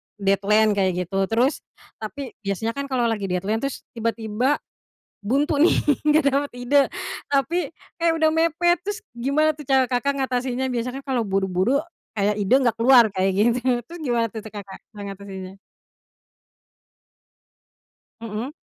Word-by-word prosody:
deadline 205 +2 +3
kayak 195 -2 +2
gitu 195 +2 -1
terus 245 +6 +1 0.4
tapi 250 +4 -6
biasanya 205 +2 -2
kan 280 +2 -5
kalau 255 -3 0
lagi 215 -4 0
deadline 195 +5 -1
terus 275 0 -4
tiba-tiba 230 +3 0 0.7
buntu 275 +9 +1
nih 335 - +5 0.3
nggak 305 0 +3
dapet 285 +1 0
ide, 245 +4 +1 0.5
tapi, 310 +6 0 0.3
eh 335 - +4
udah 320 -1 +2
mepet 335 +2 +2
terus 415 +3 -5
gimana 280 +6 +1
tuh 300 - -11
cara 265 -1 +4
Kakak 275 +3 -1
ngatasinnya? 255 -1 -1
Biasa 240 +1 -1
kan 275 - -9
kalau 260 -4 0
buru-buru 195 +4 +1 0.4
kayak 205 +1 +2
ide 200 +4 +1
nggak 245 -5 +2
keluar 240 0 +7
kayak 190 0 +1
gitu, 235 +4 +3 0.3
terus 340 +4 -10
gimana 240 -5 +1
tuh 220 - -5
Kakak 205 -3 -9
cara 210 -2 -11
ngatasinnya? 195 -1 -8 2.7
Mhm. 230 +3 -5
240 Hz, 140 wpm, -23 LUFS, 205-280 Hz, 2.7 s, keluar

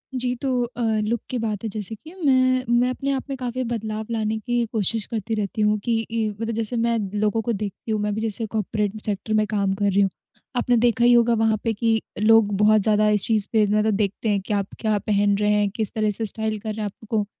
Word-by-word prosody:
जी, 250 0 0
तो 250 -1 -1
अ, 240 0 -6 0.2
लुक 230 +2 -1
की 255 - -2
बात 220 -2 -3
है 225 - -2
जैसे 215 +1 -4
कि 315 - -14
मैं, 255 -1 +3
मैं 240 +1 +3
अपने 275 +2 -2
आप 265 -1 -1
में 275 - -2
काफ़ी 255 0 -3
बदलाव 220 -2 -3
लाने 220 -1 -1
की 240 +1 0
कोशिश 220 0 +2
करती 225 0 -4
रहती 210 0 -2
हूँ 210 0 +3
कि 235 -1 +1
ई 225 -1 0
मतलब 225 +2 -4
जैसे 225 +2 -2
मैं 230 0 +1 0.2
लोगों 215 +1 +1
को 235 +1 -1
देखती 210 +1 -5
हूँ, 215 - 0
मैं 210 0 -1
भी 220 - -3
जैसे 225 0 -2
कॉर्पोरेट 215 0 -2
सेक्टर 210 +1 -2
में 215 0 +3
काम 200 -2 0
कर 205 +1 -1
रही 200 +1 +3
हूँ। 195 - +3 0.5
आपने 245 0 +2
देखा 235 0 +2
ही 245 - +6
होगा 235 0 +4
वहाँ 225 -1 +2
पे 230 - 0
कि 225 +1 +1 0.2
लोग 215 -1 +4
बहुत 215 +1 +5
ज़्यादा 215 0 +3
इस 210 -2 +3
चीज़ 215 -3 +1
पे 215 -2 +4
मतलब 215 +1 +2
देखते 205 +2 -1
हैं 205 -1 +2
कि 205 - -4
आप 200 -1 0
क्या 215 -2 +1
पहन 205 0 +1
रहे 210 0 +2
हैं, 210 -1 +2
किस 215 0 -2
तरह 215 -2 +1
से 220 +2 -2
स्टाइल 220 0 -2
कर 220 - -6
रहे 215 - -5
हैं - - -1
आपको 210 +1 -3
220 Hz, 245 wpm, -23 LUFS, 210-235 Hz, 0.5 s, ही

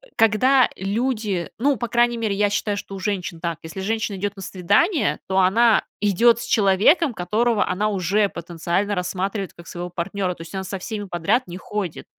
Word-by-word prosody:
когда 245 +4 +4
люди, 210 -2 -2
ну, 275 +3 +2
по 240 +3 -3
крайней 240 0 +2
мере, 220 -3 -1
я 205 0 +2
считаю, 205 0 -1
что 200 - -7
у 195 - -6
женщин 185 -4 -3
так: 170 -1 -3
если 160 +4 -7
женщина 220 0 -2
идёт 205 +1 -3
на 195 - -8
свидание, 270 - +1
то 190 0 +1
она 220 +5 +4 0.2
идёт 220 +3 +4
с - - -5
человеком, 220 - +3
которого 215 +5 +1
она 200 +4 0
уже 200 +1 +1
потенциально 175 +4 -2
рассматривает 190 +2 -3
как 170 - -13
своего 175 0 -6
партнёра. 180 +1 -3
То - - -12
есть 165 - -10
она 190 0 -3
со 195 +1 -5
всеми 205 +2 -5
подряд 195 +7 0
не 175 0 -7
ходит. 190 -2 -5
200 Hz, 185 wpm, -22 LUFS, 180-225 Hz, 0.2 s, когда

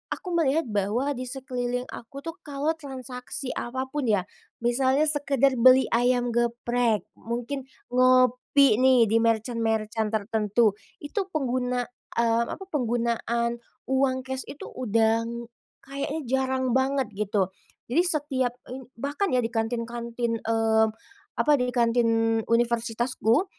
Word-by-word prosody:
aku - - -14
melihat 325 -2 +2
bahwa 210 +8 0
di 255 -1 -4
sekeliling 250 -1 -3
aku 275 +4 -9
tuh 330 +3 -7
kalau 290 +2 0
transaksi 260 -3 -6
apapun 260 +2 -3
ya, 205 -4 +2 0.4
misalnya 260 +4 +2
sekedar 275 -3 +1
beli 255 +1 +6
ayam 245 0 +2
geprek, 240 -1 +1 0.2
mungkin 245 +4 -4 0.2
ngopi 255 0 +4
nih, 255 -4 +5
di 230 - +4
merchant-merchant 225 -1 0
tertentu. 215 +1 +2 0.3
Itu 375 +7 -3
pengguna, 250 -3 0 0.3
mmm, 235 0 +2
apa, 385 - -8
penggunaan 235 -3 -1 0.3
uang 265 0 +2
cash 265 0 -5
itu 285 - -9
udang, 230 0 0 0.3
kayaknya 280 +3 -4 0.2
jarang 260 -1 0
banget 270 0 0
gitu. 200 -3 0 0.4
Jadi 315 +8 +3
setiap 275 -7 0 0.2
ini 255 0 -7
bahkan 290 - -2
ya, 250 - +3
di 230 - -2
kantin-kantin, 235 0 -2
mmm, 225 0 +2 0.5
apa, 300 - +4
di 250 -3 +2
kantin 230 -2 +2
universitasku, 235 - +1
245 Hz, 120 wpm, -26 LUFS, 230-265 Hz, 0.5 s, beli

